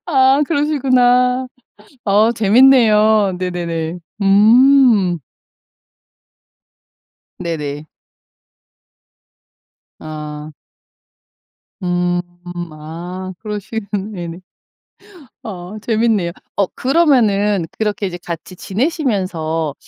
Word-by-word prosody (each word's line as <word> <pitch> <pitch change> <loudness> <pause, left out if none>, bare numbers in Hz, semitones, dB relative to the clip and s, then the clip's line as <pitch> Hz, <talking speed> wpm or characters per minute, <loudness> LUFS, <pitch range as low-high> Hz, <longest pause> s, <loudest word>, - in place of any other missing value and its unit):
아 270 -2 +4
그러시구나. 255 -4 +2 0.6
어 210 +3 +3
재밌네요. 220 -3 +4
네네네. 175 -2 -3 0.2
음. 215 -2 +5 2.2
네네. 150 -4 -4 2.1
아. 150 0 -8 1.3
음. 175 0 0 0.5
아 175 +5 -7
그러시겠 210 0 -5
네네. 185 -4 -5 1.0
어 190 0 -8
재밌네요. 220 -6 0 0.2
어 200 -2 +2
그러면은 215 - +2
그렇게 210 -1 -1
이제 175 -1 -6
같이 170 +2 -7
지내시면서 185 - -2
200 Hz, 145 characters per minute, -17 LUFS, 175-240 Hz, 2.2 s, 음